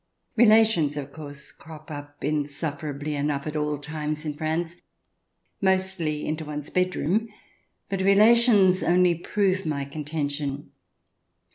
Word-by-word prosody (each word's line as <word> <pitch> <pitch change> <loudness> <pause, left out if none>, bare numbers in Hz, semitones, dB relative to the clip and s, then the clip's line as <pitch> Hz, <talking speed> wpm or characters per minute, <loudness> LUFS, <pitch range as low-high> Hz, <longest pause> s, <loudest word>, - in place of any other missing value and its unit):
Relations, 215 -10 +4
of 140 -1 -5
course, 145 -3 -9
crop 155 0 -13
up 145 0 -9
insufferably 145 0 -3
enough 145 -1 -1
at 155 0 -4
all 150 -1 -1
times 150 +1 -4
in 150 - -2
France, 160 +3 -2 0.8
mostly 190 -5 0
into 155 +1 -3
one's 150 -1 -6
bedroom, 185 +4 0 0.6
but 195 -1 -2
relations 205 -1 +5
only 180 0 +4
prove 190 +2 0
my 145 -3 -2
contention. 145 -1 -4
155 Hz, 115 wpm, -25 LUFS, 145-185 Hz, 0.8 s, relations